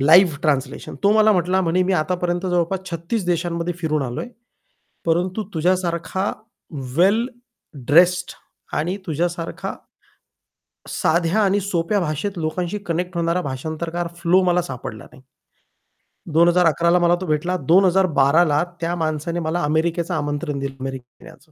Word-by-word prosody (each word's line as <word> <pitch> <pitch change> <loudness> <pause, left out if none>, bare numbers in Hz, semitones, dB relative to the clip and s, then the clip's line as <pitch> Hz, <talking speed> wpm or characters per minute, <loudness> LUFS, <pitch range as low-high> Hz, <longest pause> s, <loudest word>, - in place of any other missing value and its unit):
Live 160 +3 +6
translation. 140 -3 -1
तो 200 +1 +5
मला 215 0 +5
म्हटला 180 +1 +1
म्हणे, 180 +1 +2
"मी 190 +1 0
आतापर्यंत 180 +2 -1
जवळपास 180 +1 0
36 170 +5 -3
देशांमध्ये 170 0 -1
फिरून 155 -3 0
आलोय, 125 - -4 0.8
परंतु 180 +5 0
तुझ्यासारखा 180 +2 0 0.7
वेल 200 +7 +4 0.6
ड्रेस्ड 175 +4 +4 0.5
आणि 175 +6 -1
तुझ्यासारखा 170 +2 -3 1.2
साध्या 170 +5 +1
आणि 200 0 +2
सोप्या 190 +1 0
भाषेत 175 +4 -3
लोकांशी 170 +5 -2
कनेक्ट 175 +2 -2
होणारा 170 +1 +1
भाषांतरकार 160 +5 -4
फ्लो 180 +2 +3
मला 180 0 +2
सापडला 125 -6 -7
नाही." 130 - -17 1.1
2011 170 0 +4
ला 180 - +4
मला 175 0 +4
तो - - -3
भेटला, 175 +3 0
2012 170 -2 +4
ला 150 +2 +2 0.2
त्या 170 +1 -1
माणसाने 160 +1 -2
मला 165 +1 -1
अमेरिकेचं 165 +3 0
आमंत्रण 145 -1 -2
दिलं, 135 0 -4
अमेरिकेत 130 -2 -7
येण्याचं. 155 +1 -16
170 Hz, 130 wpm, -21 LUFS, 155-180 Hz, 1.2 s, Live